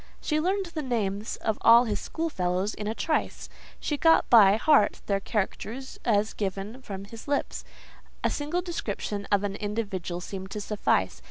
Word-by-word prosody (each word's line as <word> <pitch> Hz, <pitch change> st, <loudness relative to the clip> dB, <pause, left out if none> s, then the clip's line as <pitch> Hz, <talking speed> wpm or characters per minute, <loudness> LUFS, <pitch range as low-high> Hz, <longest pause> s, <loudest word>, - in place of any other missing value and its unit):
She 305 Hz, -1 st, 0 dB
learned 380 Hz, +4 st, 0 dB
the 310 Hz, -, -2 dB
names 215 Hz, -5 st, -2 dB
of 220 Hz, -1 st, -2 dB
all 235 Hz, +1 st, +8 dB
his 215 Hz, -4 st, -2 dB
schoolfellows 195 Hz, -, -2 dB
in 210 Hz, -, -5 dB
a 220 Hz, -, -2 dB
trice: 315 Hz, +5 st, -1 dB, 0.3 s
she 295 Hz, -, -2 dB
got 325 Hz, +2 st, +4 dB
by 205 Hz, -4 st, +8 dB
heart 225 Hz, -2 st, +4 dB
their 200 Hz, -1 st, +1 dB
characters 225 Hz, +5 st, -4 dB
as 215 Hz, -1 st, +2 dB
given 200 Hz, +5 st, -4 dB
from 195 Hz, -5 st, -7 dB
his 225 Hz, +2 st, -11 dB
lips: 285 Hz, 0 st, -1 dB, 0.6 s
a -, -, +3 dB
single 300 Hz, +5 st, -2 dB
description 205 Hz, -, -4 dB
of 205 Hz, 0 st, +3 dB
an 200 Hz, -1 st, -2 dB
individual 200 Hz, -5 st, -3 dB
seemed 190 Hz, +1 st, -7 dB
to 210 Hz, -, -5 dB
suffice. 210 Hz, 0 st, 0 dB
215 Hz, 165 wpm, -27 LUFS, 200-270 Hz, 0.6 s, all